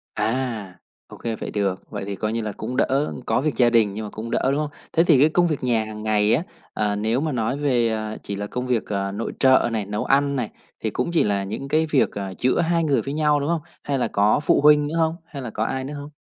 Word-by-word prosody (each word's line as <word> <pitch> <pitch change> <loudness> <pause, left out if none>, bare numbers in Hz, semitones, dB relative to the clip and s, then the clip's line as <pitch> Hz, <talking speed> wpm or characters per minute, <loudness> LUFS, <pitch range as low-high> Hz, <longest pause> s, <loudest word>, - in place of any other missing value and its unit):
À, 115 -6 -2 0.3
ô - - -12
kê, 115 -1 -3
vậy - - -6
được. 100 -3 -2
Vậy 95 - -4
thì 100 - -4
coi 110 +3 -2
như 115 - -1
là 105 -1 -3
cũng 125 +4 -4
đỡ. 140 +2 +1
Có - - +1
việc 150 0 -1
gia 120 -1 +5
đình 110 -4 +3
nhưng 110 +1 -5
mà - - -6
cũng 115 +2 -6
đỡ, - - +2
đúng 140 - 0
hông? 150 -1 -1 0.2
Thế 165 - +4
thì 160 -6 +5
cái 150 +3 +6
công 175 +2 +3
việc 155 -5 -2
nhà 115 -3 +1
hằng 105 0 -7
ngày 105 0 +2
á, 150 +8 +2 0.3
ờ, 105 -1 0
nếu 110 +5 0
mà 155 -1 -1
nói 125 +2 -1
về, 125 -5 +2
ờ, 110 -1 -3
chỉ 100 - -4
là 100 +1 -4
công 125 +4 -4
việc, 120 -3 0
ờ, 100 -1 -2
nội 105 +3 -4
trợ 130 -2 +5
này, 110 -3 -1
nấu 105 +1 -3
ăn 140 +1 +2
này, 125 -5 -2 0.3
thì - - -2
cũng 170 - -2
chỉ 170 - +3
là 100 -1 0
những 110 +8 -5
cái 155 +3 +2
việc, 150 -4 +2
ờ, 100 -2 -5
giữa 130 +5 +1
hai 170 0 +1
người 145 -4 +2
với 140 - -5
nhau, 150 -1 +2
đúng 145 +3 -2
hông? 170 -2 0 0.2
Hay 140 -1 -1
là - - +1
có 105 +5 +3
phụ - - +3
huynh 150 0 +6
nữa 160 - -4
hông? 160 0 +1
Hay 140 -4 -8
là 125 - -5
có 110 - -2
ai 130 +3 -2
nữa 140 +3 -6
hông? 145 +1 -8
125 Hz, 280 wpm, -23 LUFS, 105-145 Hz, 0.3 s, cái